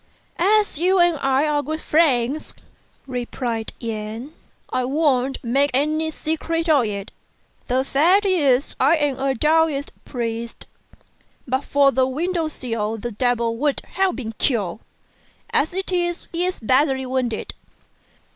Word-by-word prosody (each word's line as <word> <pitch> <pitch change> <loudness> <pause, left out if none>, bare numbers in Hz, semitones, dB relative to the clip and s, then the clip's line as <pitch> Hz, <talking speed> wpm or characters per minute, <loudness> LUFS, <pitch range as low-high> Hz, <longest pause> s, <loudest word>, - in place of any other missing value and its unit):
"As 410 -2 +3
you 370 +3 +3
and 345 -2 +4
I 270 +2 +2
are 295 -1 +1
good 310 +3 -4
friends," 295 -3 +1 0.5
replied 245 -3 -3
Yen, 225 +4 -5 0.4
"I 255 - +1
won't 270 -1 +1
make 275 +4 +2
any 310 +3 +1
secret 325 +1 -2
of 290 -7 +4
it. 200 -2 -5 0.6
The 255 +1 +1
fact 345 +10 +3
is 290 -8 +2
I 325 - +5
am 290 -4 0
a 270 0 0
Taoist 310 0 +2
priest. 230 -2 -4 0.8
But 260 +2 -1
for 280 -1 +4
the 260 -1 +2
window 330 +5 -1
sill 225 -7 -3
the 240 +2 -5
devil 235 0 0
would 285 +2 0
have 380 0 +1
been 225 -4 -5
killed; 210 -7 0 0.7
as 305 - +2
it 380 +1 -3
is, 345 -1 -1
he 345 +1 -1
is 365 - -3
badly 265 +3 +2
wounded." 255 -3 -2
275 Hz, 135 wpm, -22 LUFS, 245-320 Hz, 0.8 s, I